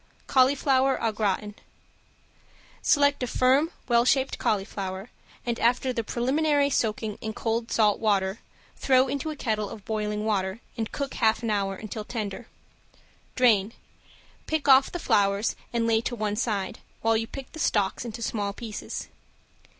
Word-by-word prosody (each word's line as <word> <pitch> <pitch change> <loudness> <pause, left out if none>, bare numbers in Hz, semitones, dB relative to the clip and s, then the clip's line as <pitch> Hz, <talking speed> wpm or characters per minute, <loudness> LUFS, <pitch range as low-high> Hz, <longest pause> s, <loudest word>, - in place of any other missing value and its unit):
~CAULIFLOWER 270 0 +3
AU 225 - +1
GRATIN~ 210 -1 -1 1.3
Select 285 -1 +3
a 250 - -1
firm, 265 +6 +3 0.2
well 235 -1 +4
shaped 265 +2 +1
cauliflower, 195 0 -2 0.3
and 235 -1 -2
after 250 +2 +2
the 230 - -2
preliminary 285 +5 +1
soaking 215 -3 -1
in 220 0 -4
cold 225 +1 -2
salt 210 -3 +3
water 200 -2 +1 0.4
throw 260 0 +3
into 280 +3 -3
a 310 - -4
kettle 215 -6 -2
of 205 - -10
boiling 210 -1 -2
water 195 -1 -1 0.2
and 225 -2 -3
cook 280 -1 -4
half 225 0 +2
an 225 - 0
hour, 195 -2 0
until 215 +2 -6
tender. 215 0 -5 0.9
Drain, 225 -4 +3 0.7
pick 315 -2 -1
off 270 0 +6
the - - -3
flowers 200 - +1 0.2
and 235 -1 0
lay 225 -1 +3
to 240 +1 -3
one 210 -2 -1
side, 210 -4 -2 0.2
while 225 0 +3
you 225 0 0
pick 270 +1 -9
the 320 - -9
stalks 205 -8 +1
into 230 -1 -6
small 205 -3 -2
pieces. 220 -1 -6
225 Hz, 150 wpm, -26 LUFS, 210-260 Hz, 1.3 s, off